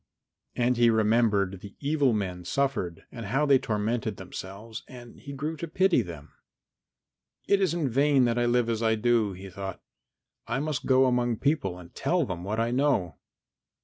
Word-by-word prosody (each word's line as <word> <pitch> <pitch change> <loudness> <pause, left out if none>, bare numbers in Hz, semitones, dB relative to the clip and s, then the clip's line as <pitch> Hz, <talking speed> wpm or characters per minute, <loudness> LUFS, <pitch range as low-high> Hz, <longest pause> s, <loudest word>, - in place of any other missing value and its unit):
And 125 0 +1
he 120 0 +5
remembered 105 -4 +2
the 100 - -11
evil 145 -2 +2
men 95 -5 -2
suffered 95 -6 -1
and 115 -4 -7
how 135 +8 +1
they 140 -2 +5
tormented 110 -1 -2
themselves 100 +4 -8
and 120 -2 -12
he 140 - -9
grew 150 +4 -3
to 170 - -5
pity 185 +3 +3
them. 85 -5 -9 1.2
"It 200 -1 +3
is 185 -3 +1
in 165 -5 0
vain 135 +1 +3
that 120 0 +1
I 120 - +2
live 120 -1 +2
as 115 -1 -1
I 110 -1 +3
do," 110 -2 +2
he 95 +2 -9
thought; 95 0 -6 0.7
"I 120 +3 -1
must 150 -1 -3
go 130 0 +5
among 120 -2 +1
people 120 - 0
and 90 -1 -13
tell 175 -4 +1
them 90 -5 -5
what 105 +4 -2
I 115 +1 +1
know." 125 - +1
120 Hz, 180 wpm, -27 LUFS, 100-135 Hz, 1.2 s, he